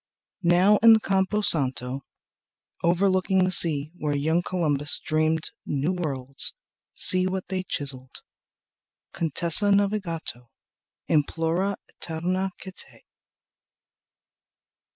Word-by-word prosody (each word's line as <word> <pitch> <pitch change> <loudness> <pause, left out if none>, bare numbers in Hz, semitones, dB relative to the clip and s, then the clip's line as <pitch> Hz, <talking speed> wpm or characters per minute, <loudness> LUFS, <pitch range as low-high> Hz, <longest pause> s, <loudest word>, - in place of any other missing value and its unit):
Now 180 +4 +2
in 230 +1 +5
the 220 - +3
Campo 195 +1 -2
Santo 130 -6 -1 0.8
overlooking 185 +2 0
The 185 - -1
sea 155 -4 +6
where 150 -4 -4
young 160 +4 -1
Columbus 150 -6 -1
dreamed 155 0 -2
new 145 +6 -3
worlds, 140 - -2 0.4
See 185 -1 +7
what 185 0 -6
they 190 -1 -3
chiseled: 135 -7 -5 0.9
"Contessa 170 +4 +4
Navigato 190 - -3 0.6
Implora 165 +5 -2
eterna 180 +4 -5
quiete." 190 -1 -13
170 Hz, 90 wpm, -23 LUFS, 150-190 Hz, 0.9 s, See